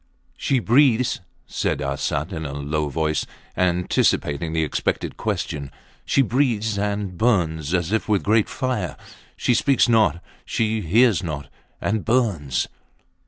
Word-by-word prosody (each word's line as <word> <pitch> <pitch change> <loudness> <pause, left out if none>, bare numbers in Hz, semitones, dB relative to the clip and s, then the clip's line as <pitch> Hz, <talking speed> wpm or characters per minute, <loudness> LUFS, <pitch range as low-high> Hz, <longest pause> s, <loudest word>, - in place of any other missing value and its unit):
She 135 - 0
breathes, 125 0 +3 0.3
said - - -1
Arsat 70 +5 -2
in 80 -2 -4
a 70 -3 -5
low 75 +1 -2
voice, 75 +1 -1 0.3
anticipating 85 -3 +1
the 80 0 +1
expected 75 - -2
question. 70 -2 -3 0.4
She 135 - +3
breathes 115 -4 +1
and 100 -2 -2
burns 85 -10 +1
as 90 +1 -1
if 110 0 0
with 105 -3 +3
a - - -15
great 110 +1 +3
fire. 125 - -2 0.4
She 125 - +2
speaks 135 +3 +3
not; 110 -7 +3 0.2
she 110 -1 -1
hears 105 +2 +4
not 75 -5 -5 0.3
and 105 0 -1
burns! 105 - +1
100 Hz, 135 wpm, -23 LUFS, 80-115 Hz, 0.4 s, hears